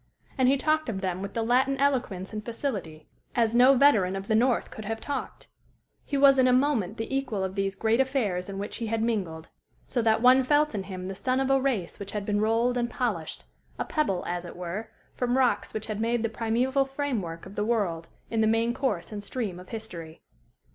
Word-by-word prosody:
And 260 Hz, -2 st, +3 dB
he 275 Hz, -, +4 dB
talked 310 Hz, 0 st, +1 dB
of 190 Hz, -4 st, -3 dB
them 185 Hz, -1 st, -2 dB
with 200 Hz, 0 st, -6 dB
the 230 Hz, -, 0 dB
Latin 260 Hz, +4 st, +2 dB
eloquence 250 Hz, -9 st, 0 dB
and 215 Hz, 0 st, -4 dB
facility, 205 Hz, -, -4 dB, 0.3 s
as 230 Hz, -2 st, +2 dB
no 250 Hz, +3 st, +7 dB
veteran 215 Hz, -9 st, +4 dB
of 195 Hz, +1 st, -5 dB
the -, -, +1 dB
north 240 Hz, +3 st, +2 dB
could 220 Hz, -, -8 dB
have 225 Hz, +1 st, -3 dB
talked; 285 Hz, +4 st, -5 dB, 0.6 s
he 280 Hz, -, -2 dB
was 275 Hz, -1 st, +6 dB
in 255 Hz, -, +5 dB
a -, -, +4 dB
moment 250 Hz, -6 st, +2 dB
the 225 Hz, +4 st, -3 dB
equal 245 Hz, -8 st, -1 dB
of 190 Hz, 0 st, -3 dB
these 195 Hz, 0 st, -1 dB
great 225 Hz, +4 st, +1 dB
affairs 220 Hz, -9 st, 0 dB
in 195 Hz, -, -5 dB
which 205 Hz, +2 st, -5 dB
he 230 Hz, -, -3 dB
had 225 Hz, 0 st, 0 dB
mingled; 180 Hz, -9 st, -2 dB, 0.4 s
so 245 Hz, -, -1 dB
that 220 Hz, 0 st, +2 dB
one 255 Hz, +1 st, +7 dB
felt 295 Hz, +2 st, +2 dB
in 195 Hz, -3 st, -3 dB
him 185 Hz, -1 st, -6 dB
the 195 Hz, -, -4 dB
son 255 Hz, +6 st, 0 dB
of 270 Hz, 0 st, +1 dB
a 270 Hz, 0 st, +4 dB
race 230 Hz, -11 st, -1 dB
which 200 Hz, -1 st, -7 dB
had 205 Hz, -1 st, -3 dB
been 205 Hz, 0 st, 0 dB
rolled 230 Hz, +3 st, +2 dB
and 240 Hz, 0 st, 0 dB
polished 205 Hz, -13 st, -3 dB, 0.3 s
a -, -, -2 dB
pebble, 195 Hz, -, 0 dB
as 175 Hz, 0 st, -3 dB
it 175 Hz, -, -9 dB
were, 180 Hz, +5 st, -5 dB, 0.2 s
from 250 Hz, 0 st, 0 dB
rocks 245 Hz, -6 st, +2 dB
which 215 Hz, -1 st, -4 dB
had 215 Hz, -1 st, -4 dB
made 230 Hz, 0 st, +1 dB
the 230 Hz, -, +1 dB
primeval 240 Hz, +5 st, +1 dB
frame 270 Hz, -3 st, -2 dB
work 165 Hz, -1 st, -7 dB
of 190 Hz, -, -10 dB
the 205 Hz, -, -1 dB
world 200 Hz, -8 st, -1 dB, 0.2 s
in 225 Hz, -1 st, +1 dB
the 220 Hz, -, +3 dB
main 225 Hz, +2 st, +2 dB
course 230 Hz, -10 st, -2 dB
and 205 Hz, -1 st, -5 dB
stream 205 Hz, -4 st, -4 dB
of 180 Hz, -, -13 dB
history. 170 Hz, -8 st, -8 dB
225 Hz, 225 wpm, -27 LUFS, 195-255 Hz, 0.6 s, no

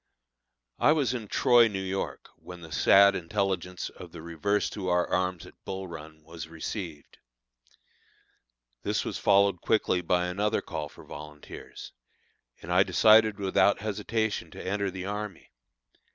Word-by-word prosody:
I 150 Hz, -, +5 dB
was 140 Hz, -6 st, +1 dB
in 115 Hz, -4 st, -5 dB
Troy, 120 Hz, +2 st, +5 dB
New 100 Hz, -3 st, -4 dB
York, 95 Hz, +1 st, -4 dB
when 90 Hz, -1 st, -11 dB
the 80 Hz, -1 st, -11 dB
sad 100 Hz, +6 st, +6 dB
intelligence 90 Hz, -1 st, -2 dB
of -, -, -12 dB
the 80 Hz, -, -10 dB
reverse 85 Hz, +5 st, 0 dB
to 95 Hz, -3 st, -5 dB
our 90 Hz, -1 st, +2 dB
arms 90 Hz, -1 st, -1 dB
at -, -, -17 dB
Bull 95 Hz, 0 st, -5 dB
Run, 80 Hz, -2 st, -10 dB
was 80 Hz, +1 st, -9 dB
received. 80 Hz, -1 st, -7 dB, 1.6 s
This -, -, -1 dB
was -, -, -4 dB
followed 100 Hz, -2 st, +3 dB
quickly 100 Hz, -5 st, +1 dB
by 90 Hz, +1 st, +1 dB
another 100 Hz, +4 st, 0 dB
call 75 Hz, -1 st, -5 dB
for -, -, -15 dB
volunteers, 75 Hz, -1 st, -10 dB, 0.7 s
and -, -, -3 dB
I -, -, +6 dB
decided 110 Hz, -1 st, +5 dB
without 100 Hz, 0 st, +2 dB
hesitation 105 Hz, -3 st, -2 dB
to -, -, -10 dB
enter 100 Hz, +1 st, -1 dB
the 95 Hz, 0 st, -6 dB
army. 105 Hz, -1 st, -6 dB
95 Hz, 145 wpm, -28 LUFS, 85-105 Hz, 1.6 s, sad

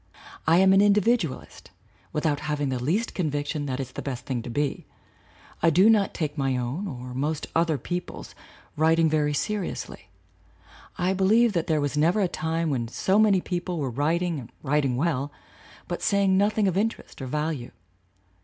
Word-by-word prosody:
I 165 Hz, +2 st, +5 dB
am 190 Hz, +1 st, +6 dB
an 195 Hz, -, +6 dB
individualist 205 Hz, -, +1 dB, 0.4 s
without 150 Hz, -1 st, 0 dB
having 145 Hz, -2 st, -2 dB
the 130 Hz, -2 st, -2 dB
least 195 Hz, -, 0 dB
convic 145 Hz, -5 st, -1 dB
tion 145 Hz, -1 st, -3 dB
that 130 Hz, -1 st, -3 dB
it's 130 Hz, -2 st, -5 dB
the -, -, -6 dB
best 130 Hz, -3 st, -5 dB
thing 125 Hz, -3 st, -2 dB
to 120 Hz, -, -8 dB
be. 145 Hz, +4 st, -2 dB, 0.7 s
I 165 Hz, -, +5 dB
do 185 Hz, +7 st, +6 dB
not 210 Hz, -3 st, +2 dB
take 150 Hz, -3 st, -3 dB
my 135 Hz, -2 st, +1 dB
own 130 Hz, +11 st, -3 dB
or 125 Hz, -5 st, -7 dB
most 145 Hz, +4 st, -2 dB
other 165 Hz, -2 st, +2 dB
people's 175 Hz, -, -6 dB, 0.4 s
writing 160 Hz, +1 st, +3 dB
very 150 Hz, -1 st, +1 dB
seriously. 205 Hz, +3 st, -4 dB, 0.9 s
I 185 Hz, +1 st, +1 dB
believe 215 Hz, +4 st, +3 dB
that 170 Hz, -3 st, -1 dB
there 155 Hz, -2 st, +2 dB
was 145 Hz, 0 st, -1 dB
never 170 Hz, +7 st, +3 dB
a 190 Hz, -, +3 dB
time 160 Hz, 0 st, -2 dB
when 120 Hz, -4 st, -1 dB
so 190 Hz, -, +1 dB
many 205 Hz, -4 st, +4 dB
people 175 Hz, 0 st, -3 dB
were 135 Hz, -5 st, -2 dB
writing 160 Hz, +5 st, 0 dB
and 120 Hz, -2 st, -11 dB
writing 140 Hz, -2 st, +1 dB
well, 145 Hz, -2 st, -1 dB, 0.6 s
but 175 Hz, -, -4 dB
saying 200 Hz, -2 st, +2 dB
noth 205 Hz, +3 st, +2 dB
ing 210 Hz, -2 st, +3 dB
of 185 Hz, -, 0 dB
interest 215 Hz, -6 st, -2 dB
or 130 Hz, -, -4 dB
value. 150 Hz, -2 st, -2 dB
160 Hz, 180 wpm, -26 LUFS, 140-190 Hz, 0.9 s, am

